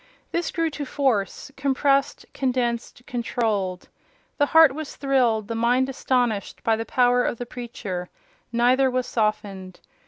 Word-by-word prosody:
This 340 0 -1
grew 330 -1 -1
to 295 - -5
force—compressed, 275 +2 0
condensed, 245 -2 -2
controlled. 220 -6 -2 0.5
The 290 - +4
heart 320 -3 +7
was 310 0 -6
thrilled, 245 -6 +1
the 230 - -3
mind 245 +3 +2
astonished, 245 -6 -1
by 225 - +3
the 225 +1 -5
power 245 0 +3
of 235 - -1
the 245 - -5
preacher: 230 -7 -6 0.4
neither 250 +3 +3
were 255 0 0
softened. 200 -6 -2
245 Hz, 130 wpm, -24 LUFS, 220-270 Hz, 0.5 s, heart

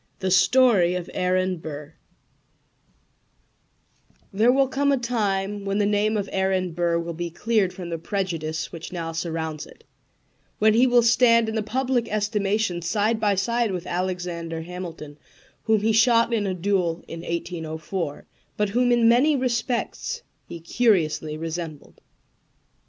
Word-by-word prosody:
THE 190 -1 -2
STORY 200 -4 +4
OF 180 -1 -5
AARON 185 0 0
BURR 150 -1 -8 2.4
There 220 +5 +4
will 270 +1 +3
come 280 +2 +1
a 275 - +3
time 205 -4 -1
when 195 0 -1
the 205 - +2
name 210 +1 +1
of 200 -1 -2
Aaron 190 -2 0
Burr 170 0 0
will 170 0 -4
be 170 +1 -4
cleared 205 +2 0
from 180 -2 -8
the 165 - -3
prejudice 165 -4 -3
which 165 -2 -8
now 165 -2 -4
surrounds 160 -2 -4
it, - - -18 0.7
when 215 0 +4
he 245 +4 +5
will 245 -1 +4
stand 230 -1 +4
in 220 - -3
the 220 - 0
public 245 +1 -1
estimation 210 -3 0
side 210 +6 0
by 205 -2 +2
side 235 +4 0
with 180 -2 -4
Alexander 175 -2 -3
Hamilton, 165 -4 -8 0.5
whom 220 -2 +3
he 220 +1 +2
shot 230 +1 +4
in 210 -3 0
a 185 - -2
duel 180 -2 0
in 165 - -7
1804, 165 -1 -4 0.3
but 210 -1 +1
whom 245 +4 +2
in 240 -1 +4
many 260 +6 +4
respects 255 - -2 0.2
he 170 - -8
curiously 165 -5 +1
resembled. 160 -2 -6
195 Hz, 145 wpm, -24 LUFS, 170-225 Hz, 2.4 s, he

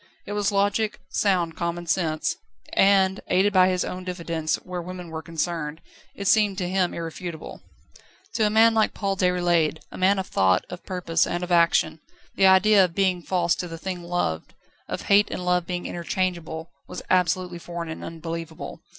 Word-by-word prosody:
It - - -7
was 205 0 0
logic, 205 +2 +1
sound 175 -5 +1
common 170 +1 -3
sense, 160 -3 0 0.4
and, 195 -1 +4
aided 195 +3 +2
by 185 -1 +6
his 180 -1 0
own 185 0 -5
diffidence 170 -3 -2
where 180 -1 -6
women 180 0 -8
were 160 0 -5
concerned, 160 -1 -3 0.4
it 200 - -4
seemed 205 -2 +3
to 180 -3 -2
him 185 -1 +1
irrefutable. 165 0 -7 0.7
To 215 -2 +2
a - - +1
man 225 +2 +5
like 220 -1 +2
Paul 195 -2 -1
Déroulède, 175 -4 +2
a - - -9
man 190 +2 +4
of 190 - -2
thought, 95 - +2
of 180 - -8
purpose, 175 -3 0
and 175 +1 -2
of 180 - -5
action, 170 -2 +3 0.3
the 195 - +4
idea 195 +2 +6
of 175 -2 -2
being 185 -2 +1
false 175 -1 +1
to 180 - -4
the 165 -1 -7
thing 180 +1 -5
loved, 170 - -3 0.3
of - - -4
hate 205 +1 +4
and 180 - -5
love 180 -1 +1
being 180 -1 -3
interchangeable, 170 -2 -3 0.2
was - - -7
absolutely 180 -1 +1
foreign 170 -1 -6
and 160 - -7
unbelievable. 165 -1 -7
180 Hz, 175 wpm, -24 LUFS, 170-190 Hz, 0.7 s, by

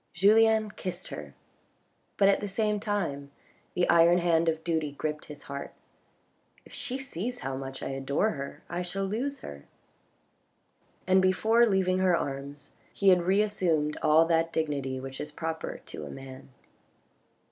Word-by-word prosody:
Julien 215 +3 +4
kissed 185 -3 -6
her, - - -8 0.8
but 195 - +5
at 200 - +4
the 205 - -4
same 210 +1 0
time 175 -10 -2 0.5
the 180 - +2
iron 170 +1 +6
hand 170 -1 +3
of 160 0 -2
duty 160 -4 -1
gripped 150 +1 -4
his 150 -1 -10
heart. 140 0 -7 0.9
If - - -16
she 280 -2 -3
sees 245 -2 -5
how 135 - -3
much 135 0 -6
I - - -3
adore 135 +10 0
her 140 -4 -7
I 175 +1 -3
shall 195 +2 -3
lose 255 +8 -3
her. 70 0 -9 1.4
And 185 +1 +4
before 220 +5 +4
leaving 185 -2 +2
her 185 -2 +3
arms, 140 +1 -6 0.2
he 200 - +3
had 180 -1 +6
reassumed 185 -7 +2
all 155 +1 +5
that 165 0 +1
dignity 140 -5 -2
which 135 0 -7
is 150 - -6
proper 160 +1 -5
to - - -7
a - - -8
man. 135 0 -10
170 Hz, 155 wpm, -28 LUFS, 145-200 Hz, 1.4 s, iron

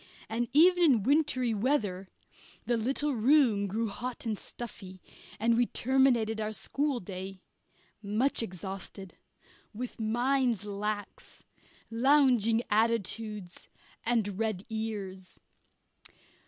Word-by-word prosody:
And 230 +1 -2
even 355 +4 +5
in 255 - +4
wintry 265 -3 +2
weather 205 -5 0 0.6
the 240 - +1
little 270 +6 -1
room 235 -4 +3
grew 220 +4 -1
hot 245 +4 -6
and 220 -2 -1
stuffy, 195 -4 -9 0.4
and 230 +2 +3
we 240 0 +2
terminated 240 -4 +2
our 215 - -1
schoolday, 195 -8 -3 0.6
much 220 +7 +1
exhausted, 190 -1 -7 0.6
with 245 +2 -6
minds 240 -1 +1
lax, 205 0 -5 0.5
lounging 240 -3 +4
attitudes, 215 -3 -1 0.3
and 220 -4 0
red 215 -4 -2
ears. 200 -4 -5
225 Hz, 100 wpm, -30 LUFS, 205-250 Hz, 0.6 s, even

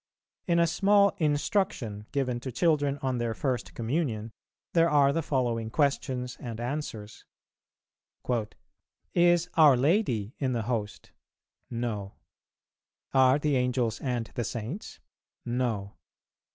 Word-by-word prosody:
In 170 -1 +3
a 170 - +5
small 200 +4 +4
"Instruction" 145 - 0
given 125 -4 -1
to 130 +1 -6
children 145 0 +1
on 130 -2 0
their 115 -1 -1
first 130 -3 -2
Communion, 115 -3 -2 0.4
there 165 0 +4
are 140 -2 +4
the 165 - 0
following 120 -6 -1
questions 130 -2 -1
and 115 -2 -6
answers: 120 -5 -5 1.9
"Is 175 0 +4
our 150 -5 +6
Lady 130 - +1
in 130 -3 0
the 115 -2 -1
Host? 105 -3 -4 0.6
No. 110 -5 -4 1.0
Are 130 0 +5
the 150 -1 0
Angels 125 -3 0
and 125 -4 -1
the 120 - -2
Saints? 120 - -6 0.5
No. 120 -5 -2
130 Hz, 115 wpm, -28 LUFS, 115-150 Hz, 1.9 s, our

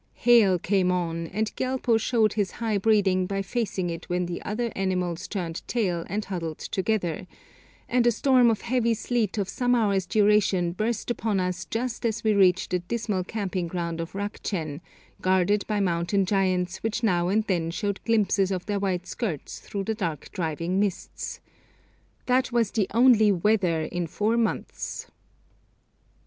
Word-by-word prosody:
Hail 225 -6 +5
came 180 +1 +1
on, 170 -2 -2
and 215 +5 -2
Gyalpo 255 -3 +1
showed 220 -1 +2
his 205 -4 -1
high 220 -3 -1
breeding 190 -3 +3
by 195 0 -2
facing 195 -4 -2
it 165 0 -7
when 180 0 0
the 175 0 -5
other 230 +3 -2
animals 180 -2 -1
'turned 175 -5 -4
tail' 180 -8 -1
and 205 +3 -2
huddled 165 -5 -4
together, 185 -4 -2 0.6
and 245 -1 +2
a - - +6
storm 250 0 +4
of 220 -2 0
heavy 235 -1 +1
sleet 230 -1 -1
of 200 -2 0
some 245 +4 +1
hours' 200 -5 +1
duration 205 -4 +3
burst 220 +5 -2
upon 220 -4 0
us 180 -1 -2
just 240 +1 -3
as 225 -2 -1
we 220 -1 +3
reached 185 -3 +3
the 180 - +1
dismal 205 0 -2
camping 190 -3 -3
ground 170 -1 -3
of 165 - -7
Rukchen, 190 -6 -4 0.4
guarded 190 +2 +2
by 210 -1 0
mountain 185 +1 +1
giants 185 -2 0
which 225 +2 -2
now 175 -5 +2
and 210 +4 +2
then 175 -6 -1
showed 200 +3 -2
glimpses 200 -4 +2
of 185 -2 -3
their 205 -1 -1
white 185 -3 -1
skirts 185 - -4
through 200 -1 -5
the 220 - -1
dark 170 - -4
driving 170 +1 -2
mists. 200 -3 -3 0.8
That 255 +1 +2
was 235 -3 +1
the 210 -5 0
only 230 -2 +5
'weather' 185 -4 +2
in 175 +1 -3
four 210 +8 0
months. 235 -1 -3
195 Hz, 160 wpm, -26 LUFS, 180-220 Hz, 0.8 s, a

